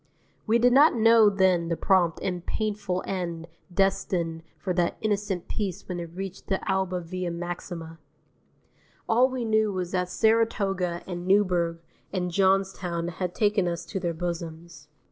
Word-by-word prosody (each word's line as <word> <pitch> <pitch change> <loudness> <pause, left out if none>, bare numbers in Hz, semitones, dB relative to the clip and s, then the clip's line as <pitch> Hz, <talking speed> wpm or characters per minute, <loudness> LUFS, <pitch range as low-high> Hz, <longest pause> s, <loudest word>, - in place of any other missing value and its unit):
We 225 +2 +4
did 245 +1 +4
not 290 +3 +6
know 225 -1 +6
then 190 -4 +2
the 170 -1 -1
prompt 180 -4 +2
and 180 -2 -2
painful 205 -4 -2
end 170 -3 -4 0.2
destined 175 -3 0 0.2
for 185 - -2
that 175 -1 0
innocent 205 -4 -1
piece 200 -5 -4
when 180 -2 -4
it 170 -1 -6
reached 195 0 -6
the 190 - 0
Alba 190 -2 0
Via 180 +1 -4
Maxima. 170 -1 -6 1.1
All 245 +3 +4
we 255 -2 -3
knew 220 -1 +2
was 185 -2 -3
that 180 -1 -1
Saratoga 195 -5 +1
and 175 -1 -6
Newburgh 180 -4 +2 0.3
and 180 -2 -2
Johnstown 190 -2 +1
had 175 +1 -4
taken 205 -3 +2
us 170 0 -3
to 180 +3 -4
their 170 -3 -2
bosoms. 165 -3 -6
185 Hz, 150 wpm, -26 LUFS, 170-200 Hz, 1.1 s, not